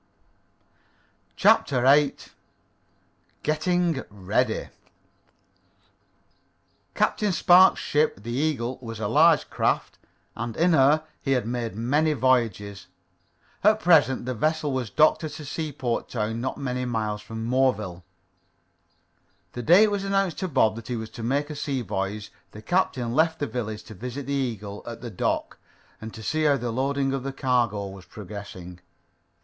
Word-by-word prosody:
CHAPTER 130 -3 +3
VIII 140 +2 +5 1.3
GETTING 165 0 +1
READY 105 +4 -1 2.3
Captain 210 -2 +1
Spark's 180 +2 +6
ship, 145 -9 0
the 120 - -5
Eagle, 130 -2 -1
was 115 -3 -7
a 105 - -1
large 155 +7 +4
craft, - - -1 0.4
and 115 0 -5
in 170 +1 +3
her 150 +2 +4 0.2
he 135 - 0
had 125 -4 0
made 120 -2 -3
many 145 +8 +1
voyages. 115 -7 0 0.8
At 215 +2 +5
present 150 - +4
the 130 - -2
vessel 155 +4 0
was 130 -4 -2
docked 155 +6 +3
at 155 -1 -6
a 150 - -8
seaport 140 -5 -3
town 110 0 -2
not 130 - -3
many 125 -2 -3
miles 110 -3 -2
from 110 +1 -6
Moreville. 110 -8 0 1.5
The 120 - -5
day 175 - +6
it 215 - +3
was 200 -1 -1
announced 195 -3 0
to 190 - -2
Bob 120 -9 +2
that 115 - -9
he 125 - -2
was 110 -1 -6
to 120 - -9
make 140 +6 -1
a - - -6
sea 140 -3 -2
voyage, 100 +1 -4 0.2
the 105 - -11
captain 130 - 0
left 160 +3 +2
the 145 - -2
village 110 -5 -5
to - - -11
visit 125 +7 -6
the 140 - -3
Eagle 110 -7 -3
at 115 -1 -7
the 120 -2 -6
dock 90 - -2 0.4
and 110 0 -8
see 155 0 0
how 145 -2 +4
the 120 -1 -3
loading 135 +2 0
of 135 - -2
the 135 +2 -4
cargo 120 -6 0
was 95 -2 -10
progressing. 95 -3 -9
125 Hz, 150 wpm, -25 LUFS, 110-150 Hz, 2.3 s, Spark's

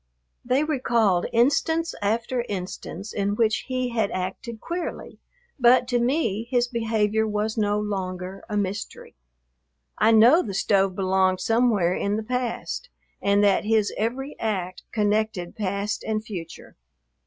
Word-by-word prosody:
They 255 +4 +2
recalled 235 - +1
instance 320 +7 +2
after 235 +4 0
instance 190 0 -6
in 200 0 0
which 220 -1 +1
he 255 -1 -1
had 225 -4 0
acted 195 +5 -5
queerly, 345 +6 -5 0.4
but 245 0 +5
to 245 -2 +2
me 235 -4 0
his 245 -1 +2
behavior 220 -2 0
was 215 +1 -1
no 210 -2 +1
longer 190 -2 -4
a 210 - -1
mystery. 200 0 -4 0.9
I 215 - +5
know 230 +9 +7
the 200 - -5
stove 195 -1 +2
belonged 190 -1 +2
somewhere 225 -7 +2
in 200 +2 -1
the 220 - -3
past 250 - -3 0.3
and 200 +1 +3
that 200 -2 +3
his 215 -1 +2
every 255 +6 -3
act 185 -5 -2
connected 210 -4 0
past 200 -1 -2
and 215 0 -2
future. 175 -7 -8
215 Hz, 135 wpm, -24 LUFS, 200-240 Hz, 0.9 s, know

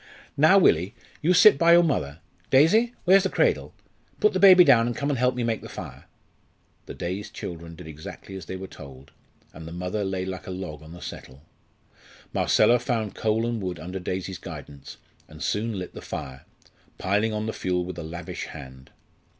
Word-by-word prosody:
"Now, 155 +7 +6
Willie, 95 - +3 0.3
you 165 - +2
sit 210 +4 +7
by 170 0 +6
your 175 0 +7
mother. 80 - -2 0.3
Daisy, 215 - +4
where's 190 +2 +6
the 190 - -1
cradle? - - 0 0.4
Put 425 - +3
the - - 0
baby 185 -2 +9
down 120 -7 +5
and 120 - -3
come 140 +1 -1
and 135 - -2
help 125 0 +2
me 125 - -2
make 115 -1 -1
the - - -10
fire." - - -9 0.8
The - - -8
dazed 95 +4 -5
children 85 -1 -7
did 90 - -11
exactly 80 +5 -10
as 95 -3 -8
they 95 - -5
were 95 +1 -6
told, 70 -6 -13 0.4
and 80 +1 -10
the - - -8
mother 90 +4 -3
lay 95 -1 -2
like 95 -1 -7
a - - -6
log 90 -5 -6
on 80 +1 -12
the 90 - -11
settle. 65 -3 -10 0.9
Marcella 120 +3 +4
found 110 -6 -2
coal 110 +1 0
and 120 -2 -2
wood 90 -3 -4
under 90 +4 -6
Daisy's 95 +1 -4
guidance, 75 -5 -10 0.3
and 75 +1 -10
soon 110 0 -1
lit 90 -1 -6
the - - -9
fire, 65 0 -7 0.5
piling 105 +4 0
on 105 0 -3
the 110 - -3
fuel 90 -1 -1
with 90 -1 -7
a - - -5
lavish 85 +2 -6
hand. 65 0 -11
95 Hz, 195 wpm, -25 LUFS, 85-120 Hz, 0.9 s, baby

